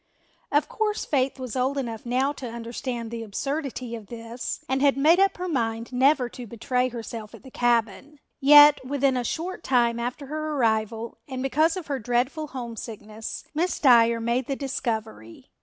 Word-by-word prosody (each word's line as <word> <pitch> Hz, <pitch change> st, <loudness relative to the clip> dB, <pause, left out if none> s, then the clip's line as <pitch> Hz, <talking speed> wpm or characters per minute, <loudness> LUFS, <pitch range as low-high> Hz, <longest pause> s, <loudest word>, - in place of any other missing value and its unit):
Of 290 Hz, +1 st, +2 dB
course 430 Hz, -1 st, -1 dB
Faith 270 Hz, -2 st, 0 dB
was 255 Hz, -2 st, -6 dB
old 260 Hz, +2 st, 0 dB
enough 235 Hz, -3 st, -4 dB
now 260 Hz, +3 st, +1 dB
to 260 Hz, -4 st, -7 dB
understand 235 Hz, 0 st, -5 dB
the 230 Hz, -1 st, -5 dB
absurdity 255 Hz, +2 st, -4 dB
of 220 Hz, -3 st, -10 dB
this 235 Hz, +1 st, -6 dB
and 265 Hz, 0 st, 0 dB
had 280 Hz, -1 st, +4 dB
made 320 Hz, +6 st, +5 dB
up 390 Hz, 0 st, +3 dB
her 365 Hz, 0 st, -3 dB
mind 230 Hz, -6 st, -2 dB
never 260 Hz, 0 st, +3 dB
to 245 Hz, 0 st, -9 dB
betray 250 Hz, +3 st, -1 dB
herself 230 Hz, -2 st, -7 dB
at -, -, -16 dB
the 265 Hz, -, -13 dB
cabin. 240 Hz, +4 st, 0 dB, 0.2 s
Yet 295 Hz, 0 st, +8 dB
within 275 Hz, 0 st, +1 dB
a 250 Hz, -, 0 dB
short 340 Hz, +7 st, -4 dB
time 235 Hz, -2 st, +2 dB
after 245 Hz, +4 st, -4 dB
her 310 Hz, +2 st, -3 dB
arrival 225 Hz, -2 st, -1 dB
and 260 Hz, -2 st, -4 dB
because 310 Hz, +6 st, +2 dB
of 360 Hz, -, -5 dB
her 280 Hz, -3 st, -3 dB
dreadful 250 Hz, +7 st, -1 dB
homesickness, 225 Hz, -4 st, -7 dB
Miss 340 Hz, +4 st, -1 dB
Dyer 235 Hz, -4 st, +5 dB
made 235 Hz, +2 st, -1 dB
the 275 Hz, -, -1 dB
discovery. 220 Hz, -, -5 dB
255 Hz, 175 wpm, -25 LUFS, 230-280 Hz, 0.2 s, Yet